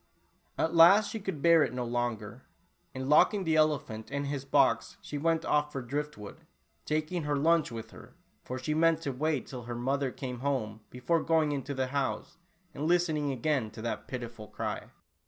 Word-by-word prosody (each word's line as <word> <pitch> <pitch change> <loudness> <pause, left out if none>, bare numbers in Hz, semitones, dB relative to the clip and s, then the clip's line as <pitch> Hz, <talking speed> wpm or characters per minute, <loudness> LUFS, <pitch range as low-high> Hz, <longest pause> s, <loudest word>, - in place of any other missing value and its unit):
At 160 - 0
last 190 +6 +7
she 225 - -4
could 190 -8 -5
bear 170 -1 +6
it 125 - 0
no 125 -1 -2
longer, 120 -2 -3 0.5
and 130 0 -4
lock 150 +8 +5
ing 200 - -2
the 160 -2 +1
elephant 145 -8 +1
in 140 0 -2
his 140 -1 -4
box, 135 - +2
she 145 - -6
went 165 +1 +1
off 150 0 +1
for 135 -3 -4
drift 145 +3 -3
wood, 105 -1 -9 0.5
taking 155 +3 -1
her 150 -1 -1
lunch 160 0 +2
with 115 -1 -7
her, - - -14 0.3
for 130 - -5
she 130 +4 -2
meant 165 +1 +3
to 140 -4 -2
w^ait 150 +1 -1
till 125 -3 -8
her 120 0 -5
mother 135 +3 0
came 125 -1 -6
home 120 -6 -2
before 130 +7 0
going 160 -2 +2
into 140 0 -3
the 130 0 0
house, 140 +3 -2 0.3
and 150 +3 -3
listening 160 -4 +2
again 130 -2 0
to 110 +1 -10
that 120 - -4
pitiful 120 -4 -7
cry. - - -4
140 Hz, 190 wpm, -30 LUFS, 125-160 Hz, 0.5 s, last